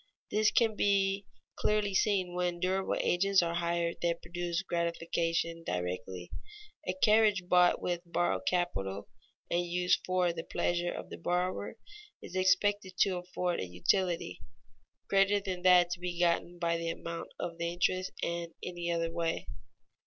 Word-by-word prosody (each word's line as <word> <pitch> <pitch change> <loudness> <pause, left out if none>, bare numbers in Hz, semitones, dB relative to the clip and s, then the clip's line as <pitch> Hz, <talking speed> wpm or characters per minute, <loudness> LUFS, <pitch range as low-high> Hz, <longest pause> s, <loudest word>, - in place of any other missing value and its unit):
_ - - -34 0.3
This 215 +1 +4
can 225 -2 +2
be 195 -1 +1 0.3
clearly 210 -2 +1
seen 190 -3 +1
when 180 -1 -1
durable 190 +1 0
agents 195 +1 +3
are 170 0 -1
hired 170 0 -1
that 170 -1 -1
produce 175 +1 -3
gratification 170 -1 -1
directly. 90 - -4 0.6
A - - -1
carriage 210 -4 +4
bought 180 -1 +5
with 175 -1 -1
borrowed 175 0 -1
capital 100 - -1 0.4
and 175 - +2
used 180 +1 +1
for 180 -2 +1
the 165 -1 -5
pleasure 175 0 -1
of - - -7
the - - -7
borrower 180 - -1 0.4
is 180 - -10
expected 185 0 +2
to 190 -2 +3
afford 180 0 -2
a 95 - -3
utility 165 - 0 0.7
greater 195 +1 +4
than 190 -3 -4
that 180 -1 +6
to 175 - -3
be 175 -1 -4
gotten 175 0 +1
by 170 -1 0
the 165 0 -3
amount 170 0 -5
of 170 -1 -5
the 170 0 -1
interest 185 +1 0
in 170 0 -3
any 175 -1 -3
other 165 -1 -1
way. 165 -1 -2
175 Hz, 155 wpm, -31 LUFS, 170-185 Hz, 0.7 s, that